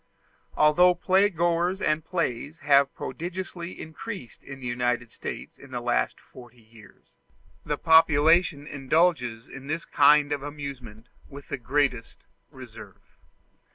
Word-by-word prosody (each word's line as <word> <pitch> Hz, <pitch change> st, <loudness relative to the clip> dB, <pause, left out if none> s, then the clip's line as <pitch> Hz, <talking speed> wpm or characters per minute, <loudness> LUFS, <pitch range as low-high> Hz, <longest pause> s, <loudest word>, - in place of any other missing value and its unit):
Although 175 Hz, +4 st, +5 dB
playgoers 180 Hz, -1 st, +1 dB
and 155 Hz, -2 st, 0 dB
plays 155 Hz, -4 st, -3 dB
have 140 Hz, -1 st, +4 dB
prodigiously 175 Hz, +4 st, -6 dB
increased 160 Hz, -, -9 dB
in 135 Hz, -1 st, -10 dB
the 130 Hz, -, -9 dB
United 120 Hz, -1 st, -1 dB
States -, -, -8 dB
in -, -, -14 dB
the -, -, -4 dB
last -, -, -1 dB
forty 120 Hz, -1 st, -16 dB
years, 110 Hz, -2 st, -20 dB, 0.5 s
the -, -, -2 dB
population 160 Hz, -1 st, +4 dB
indulges 135 Hz, -5 st, 0 dB
in 135 Hz, 0 st, -11 dB
this 155 Hz, +3 st, -3 dB
kind 145 Hz, 0 st, +4 dB
of 145 Hz, -1 st, -1 dB
amusement 135 Hz, -6 st, -8 dB, 0.2 s
with 140 Hz, 0 st, -12 dB
the -, -, -3 dB
greatest 130 Hz, -2 st, -1 dB, 0.3 s
reserve. -, -, -14 dB
145 Hz, 120 wpm, -26 LUFS, 125-170 Hz, 0.5 s, Although